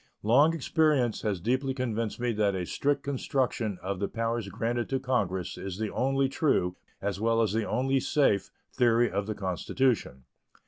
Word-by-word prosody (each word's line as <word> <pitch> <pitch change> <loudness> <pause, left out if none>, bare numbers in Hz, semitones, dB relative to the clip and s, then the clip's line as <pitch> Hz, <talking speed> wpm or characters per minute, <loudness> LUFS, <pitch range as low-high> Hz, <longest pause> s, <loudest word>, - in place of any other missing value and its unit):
Long 140 +10 +5
experience 150 -6 +1
has 105 -4 -1
deeply 130 +7 0
convinced 115 -4 -2
me 120 0 0
that 105 -3 +1
a 90 -1 -2
strict 140 +8 0
construction 130 -6 -1
of 95 0 -3
the 100 - 0
powers 115 -2 -2
granted 120 +3 -2
to 135 - 0
Congress 100 -9 -1
is 95 -2 -5
the 110 -1 -2
only 135 +1 +1
true, 130 - +1 0.3
as 100 0 -2
well 115 0 +2
as 110 -3 +2
the 110 -1 -1
only 135 +4 +1
safe, 130 -7 +2 0.2
theory 120 -1 +3
of 100 +1 -2
the 110 - -3
Constitution. 95 - -1
115 Hz, 170 wpm, -28 LUFS, 100-130 Hz, 0.3 s, Long